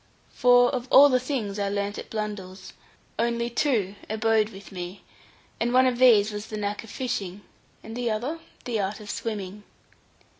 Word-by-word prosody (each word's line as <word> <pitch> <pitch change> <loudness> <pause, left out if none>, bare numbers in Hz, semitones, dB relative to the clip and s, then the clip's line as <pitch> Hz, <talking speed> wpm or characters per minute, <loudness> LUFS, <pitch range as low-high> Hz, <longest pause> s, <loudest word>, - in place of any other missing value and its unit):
For 245 0 +5
of 250 -1 -3
all 285 +2 +8
the 255 -1 +3
things 240 -6 -3
I 200 -1 0
learned 200 0 -2
at - - -9
Blundell's, 205 -3 -6 0.5
only 235 0 0
two 230 -8 +1 0.2
abode 220 0 +2
with 200 -2 -12
me, 180 +1 -7 0.6
and 235 +1 0
one 255 +1 +5
of 250 -1 +1
these 220 -5 +6
was 210 +1 -6
the 215 - -5
knack 205 +1 -3
of 225 - -13
fishing, 205 -7 -4 0.4
and 225 +1 -8
the 245 -1 -1
other 245 +10 -2 0.3
the 235 -3 -1
art 200 +2 -2
of 210 -1 -7
swimming. 210 -3 -5
220 Hz, 175 wpm, -26 LUFS, 205-245 Hz, 0.6 s, all